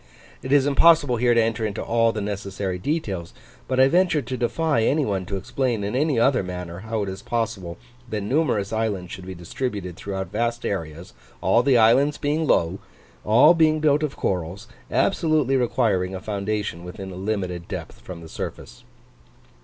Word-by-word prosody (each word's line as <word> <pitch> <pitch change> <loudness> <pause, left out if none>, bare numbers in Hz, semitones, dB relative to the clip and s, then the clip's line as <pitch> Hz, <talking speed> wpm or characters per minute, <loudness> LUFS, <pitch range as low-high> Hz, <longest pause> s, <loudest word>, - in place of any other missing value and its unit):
It 130 - -6
is 140 -1 +5
impossible 145 -2 +4
here 120 0 +3
to 115 - +5
enter 115 0 -1
into 105 -2 -2
all 115 -1 +2
the 110 - -4
necessary 100 -2 -4
details, 100 - -3 0.3
but 130 0 0
I 130 - +7
venture 175 -1 +2
to 125 +2 -4
defy 125 +2 0
any 145 +6 +2
one 95 -4 -2
to 100 - -3
explain 120 +1 -2
in 100 +4 -3
any 145 -2 +1
other 130 +2 +3
manner 90 -2 -6
how 110 +1 -3
it 100 - -4
is 95 +1 -7
possible 110 -7 -3 0.3
that 105 -2 -2
numerous 110 -3 0
islands 105 -5 -2
should 95 0 -8
be 95 - -6
distributed 90 +1 -4
throughout 95 -1 -5
vast 120 +1 -1
areas 85 -1 -4 0.3
all 120 - +3
the 130 -1 +4
islands 130 +6 +4
being 150 +2 -1
low 85 -2 +2 0.4
all 125 +10 +6
being 155 -2 +3
built 150 -1 +3
of 150 -3 -3
corals, 90 0 -3 0.2
absolutely 155 -5 +2
requiring 110 -7 +1
a - - -4
foundation 100 -3 -3
within 95 +2 -8
a - - -8
limited 95 -3 -3
depth - - -7
from 90 -2 -9
the 80 - -10
surface. - - -7
110 Hz, 175 wpm, -23 LUFS, 95-130 Hz, 0.4 s, I